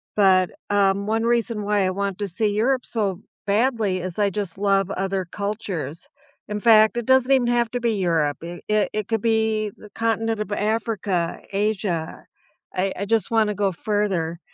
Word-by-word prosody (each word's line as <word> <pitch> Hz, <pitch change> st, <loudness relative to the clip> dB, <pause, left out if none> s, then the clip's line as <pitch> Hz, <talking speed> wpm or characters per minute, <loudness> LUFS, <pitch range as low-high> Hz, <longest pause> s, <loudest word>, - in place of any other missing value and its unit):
but, 190 Hz, -3 st, +4 dB, 0.2 s
um, 200 Hz, 0 st, +2 dB
one 225 Hz, +1 st, +1 dB
reason 230 Hz, -2 st, 0 dB
why 205 Hz, -2 st, +1 dB
I -, -, +1 dB
want 200 Hz, 0 st, -3 dB
to 205 Hz, -, -2 dB
see 210 Hz, +4 st, -1 dB
Europe 250 Hz, +4 st, +1 dB
so 205 Hz, -4 st, -2 dB, 0.3 s
badly 215 Hz, -3 st, +1 dB
is 185 Hz, +2 st, -5 dB
I 205 Hz, -1 st, +3 dB
just 195 Hz, -2 st, -4 dB
love 195 Hz, -1 st, +2 dB
other 190 Hz, -1 st, -2 dB
cultures. 195 Hz, -7 st, -4 dB, 0.4 s
In 210 Hz, 0 st, -3 dB
fact, 220 Hz, 0 st, +5 dB
it 240 Hz, -, -2 dB
doesn't 260 Hz, 0 st, +4 dB
even 255 Hz, -3 st, +4 dB
have 240 Hz, -1 st, +2 dB
to 245 Hz, -, -2 dB
be 230 Hz, -2 st, +1 dB
Europe. 165 Hz, -6 st, +1 dB
Eh, 175 Hz, +1 st, -7 dB
it 210 Hz, -1 st, +2 dB
it 215 Hz, -2 st, -2 dB
could 225 Hz, -2 st, -1 dB
be 220 Hz, -2 st, +1 dB
the 210 Hz, -, -13 dB
continent 225 Hz, -1 st, 0 dB
of 205 Hz, -, -5 dB
Africa, 205 Hz, -5 st, -1 dB
Asia. 195 Hz, -5 st, -2 dB, 0.5 s
I 190 Hz, +1 st, 0 dB
I 200 Hz, -, -3 dB
just 225 Hz, +1 st, +1 dB
wanna 215 Hz, -2 st, +3 dB
go 195 Hz, -1 st, +1 dB
further. 180 Hz, -4 st, -1 dB
205 Hz, 180 wpm, -23 LUFS, 190-225 Hz, 0.5 s, fact